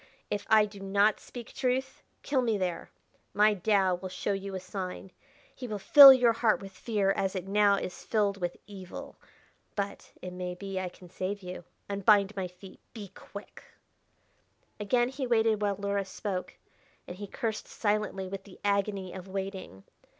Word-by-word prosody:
If 205 Hz, -, -3 dB
I 215 Hz, -1 st, +6 dB
do 205 Hz, -1 st, -11 dB
not 200 Hz, +2 st, +2 dB
speak 240 Hz, -2 st, -10 dB
truth, 265 Hz, +1 st, -1 dB, 0.2 s
kill 275 Hz, -2 st, +1 dB
me 225 Hz, -4 st, +1 dB
there. 180 Hz, -3 st, -3 dB, 0.5 s
My 210 Hz, +1 st, +5 dB
Tao 195 Hz, -1 st, +2 dB
will 180 Hz, +1 st, -5 dB
show 185 Hz, +2 st, -2 dB
you 195 Hz, 0 st, -5 dB
a -, -, -3 dB
sign; 185 Hz, 0 st, -6 dB, 0.4 s
he 250 Hz, -, -7 dB
will 215 Hz, -2 st, -3 dB
fill 275 Hz, +7 st, +11 dB
your 245 Hz, -3 st, +5 dB
heart 225 Hz, -1 st, +2 dB
with 195 Hz, -1 st, -9 dB
fear 200 Hz, 0 st, 0 dB
as 195 Hz, 0 st, -1 dB
it 185 Hz, 0 st, -4 dB
now 205 Hz, 0 st, +4 dB
is 185 Hz, -2 st, -5 dB
filled 200 Hz, -3 st, 0 dB
with 175 Hz, 0 st, -2 dB
evil. 190 Hz, -3 st, -9 dB, 0.6 s
But, 200 Hz, -1 st, -4 dB
it 180 Hz, 0 st, -7 dB
may 180 Hz, 0 st, -4 dB
be 195 Hz, 0 st, -5 dB
I 185 Hz, -1 st, -3 dB
can 180 Hz, -1 st, -16 dB
save 195 Hz, +2 st, -4 dB
you. 180 Hz, -1 st, -7 dB, 0.2 s
Unbind 200 Hz, 0 st, +3 dB
my 190 Hz, -2 st, -2 dB
feet! 180 Hz, +2 st, -14 dB, 0.2 s
Be 205 Hz, -3 st, -7 dB
quick!" 200 Hz, +3 st, -11 dB, 1.2 s
Again 240 Hz, +4 st, +2 dB
he 265 Hz, 0 st, -4 dB
waited 225 Hz, -2 st, +2 dB
while 205 Hz, -1 st, +1 dB
Luhra 200 Hz, 0 st, -1 dB
spoke, 190 Hz, -2 st, -4 dB, 0.5 s
and 175 Hz, -, -8 dB
he 205 Hz, +1 st, -6 dB
cursed 220 Hz, +2 st, -4 dB
silently 205 Hz, -3 st, -1 dB
with 195 Hz, +1 st, -6 dB
the 195 Hz, -, -15 dB
agony 200 Hz, -2 st, 0 dB
of 185 Hz, 0 st, -8 dB
waiting. 190 Hz, -, -6 dB
200 Hz, 170 wpm, -29 LUFS, 190-215 Hz, 1.2 s, fill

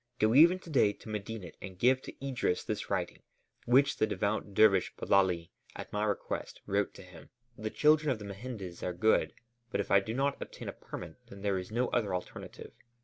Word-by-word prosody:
Go 110 Hz, 0 st, +3 dB
even 165 Hz, +7 st, +7 dB
to 170 Hz, -, -12 dB
day 105 Hz, -8 st, +4 dB
to 110 Hz, -, -13 dB
Medinet 105 Hz, -3 st, -6 dB
and 95 Hz, -1 st, -8 dB
give 130 Hz, +5 st, +3 dB
to 135 Hz, -, -8 dB
Idris 125 Hz, -9 st, 0 dB
this 105 Hz, -, -4 dB
writing, 95 Hz, -3 st, -2 dB, 0.5 s
which 135 Hz, +4 st, +4 dB
the 110 Hz, -, +2 dB
devout 105 Hz, -1 st, -2 dB
dervish 100 Hz, -4 st, +4 dB
Bellali, 90 Hz, -4 st, +2 dB, 0.2 s
at -, -, -8 dB
my 105 Hz, 0 st, 0 dB
request, 105 Hz, -2 st, -3 dB
wrote 100 Hz, 0 st, 0 dB
to -, -, -11 dB
him. 90 Hz, -3 st, -14 dB, 0.3 s
The 110 Hz, -1 st, -4 dB
children 150 Hz, +4 st, +3 dB
of 130 Hz, -, +1 dB
the 105 Hz, -, -9 dB
mehendes 100 Hz, -3 st, -7 dB
are 90 Hz, -, -2 dB
good, 110 Hz, +5 st, +2 dB, 0.3 s
but -, -, -2 dB
if 100 Hz, -, -2 dB
I 100 Hz, -, +7 dB
do 110 Hz, +4 st, -5 dB
not 140 Hz, +1 st, 0 dB
obtain -, -, -8 dB
a -, -, -6 dB
permit, 85 Hz, -2 st, -9 dB
then 100 Hz, -3 st, -11 dB
there 100 Hz, -2 st, +1 dB
is 90 Hz, -, -7 dB
no 120 Hz, +3 st, 0 dB
other 105 Hz, -6 st, 0 dB
alternative. 90 Hz, -, -7 dB
105 Hz, 200 wpm, -31 LUFS, 95-125 Hz, 0.5 s, even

